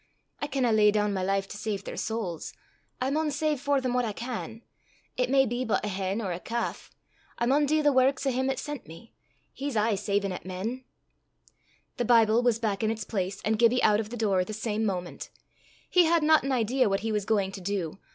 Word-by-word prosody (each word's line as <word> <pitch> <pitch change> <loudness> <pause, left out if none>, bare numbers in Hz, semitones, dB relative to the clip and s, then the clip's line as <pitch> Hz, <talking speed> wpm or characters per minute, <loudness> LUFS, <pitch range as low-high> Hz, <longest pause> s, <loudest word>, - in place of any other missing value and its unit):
I 290 - -1
canna 260 -4 +1
lay 215 -1 +5
doon 210 0 +1
my 190 - -1
life 195 +1 0
to - - -7
save 205 -2 -3
their - - -6
sowls; 215 -7 -4 0.5
I 260 +2 0
maun 310 +1 +1
save 295 0 0
for 285 -1 +2
them 255 -2 -2
what 250 0 +2
I 220 -3 -2
can 230 0 -6 0.5
it 250 0 0
may 270 0 +4
be 240 +1 -2
but 220 -3 0
a - - -2
hen 195 +3 -2
or 190 - -2
a 175 - -3
calf. 235 +4 -4 0.5
I 235 - 0
maun 285 +4 +3
dee 310 +2 +2
the 290 -1 +4
warks 265 +1 +3
o' 270 - +2
him 260 +1 0
'at 270 - -1
sent 295 - -6
me 165 +9 -13 0.4
he's 275 -4 -3
aye 215 +1 +2
savin' 200 0 -1
at 180 - -6
men." 210 +8 -5 1.1
The 245 - 0
Bible 230 -1 +5
was 245 -3 +2
back 215 -4 -1
in 215 - +2
its 220 -1 -2
place, 195 -2 -3
and 220 0 +1
Gibbie 240 +2 +4
out 210 -1 +4
of 215 -1 -3
the 240 - -6
door 200 -5 +2
the 215 - -7
same 220 0 -2
moment. 180 -3 -4 0.6
He 360 -2 +5
had 330 -1 +3
not 315 +1 +5
an 275 - -2
idea 250 0 +2
what 195 0 0
he 225 +1 -2
was 210 -1 0
going 200 -3 +1
to 195 - -8
do. 190 -2 -3
225 Hz, 230 wpm, -28 LUFS, 200-260 Hz, 1.1 s, lay